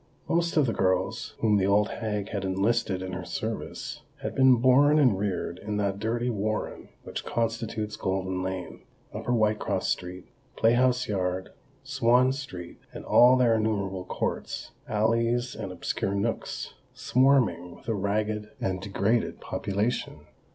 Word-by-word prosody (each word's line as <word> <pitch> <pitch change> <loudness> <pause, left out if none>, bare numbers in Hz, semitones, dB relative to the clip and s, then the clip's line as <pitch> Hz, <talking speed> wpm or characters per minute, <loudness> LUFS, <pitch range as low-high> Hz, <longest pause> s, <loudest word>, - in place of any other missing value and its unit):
Most 170 0 +1
of 150 - +5
the 115 - 0
girls 95 +4 0
whom 105 -2 +4
the 95 -1 +2
old 105 +1 +3
hag 105 -3 -3
had 100 -2 -3
enlisted 95 0 0
in 95 - -5
her 90 0 -5
service, - - -5 0.2
had - - -3
been 130 -1 +6
born 130 +5 +5
and 130 -9 +5
reared 95 -3 -2
in 105 0 -3
that 100 -1 -1
dirty 120 +3 -1
warren 110 0 -3
which - - -5
constitutes 115 -2 -2
Golden 95 -1 -2
Lane, 95 -1 -5 0.3
Upper 120 - -3
Whitecross 110 -2 +1
Street, 90 0 -3 0.3
Playhouse 125 +2 +3
Yard, 95 -2 -2 0.3
Swan 130 -2 +3
Street, 95 -12 -8
and - - -9
all 125 +1 +6
their 120 -2 +4
innumerable 100 -4 -1
courts, - - -3 0.2
alleys, 115 +3 +1
and 100 -4 -6
obscure 95 +2 -2
nooks, 110 +3 -3 0.2
swarming 120 -10 +2
with - - -19
a 115 - +1
ragged 105 +1 -1
and 95 0 -2
degraded 100 +4 0
population. 105 +5 -2
105 Hz, 145 wpm, -27 LUFS, 95-120 Hz, 0.3 s, been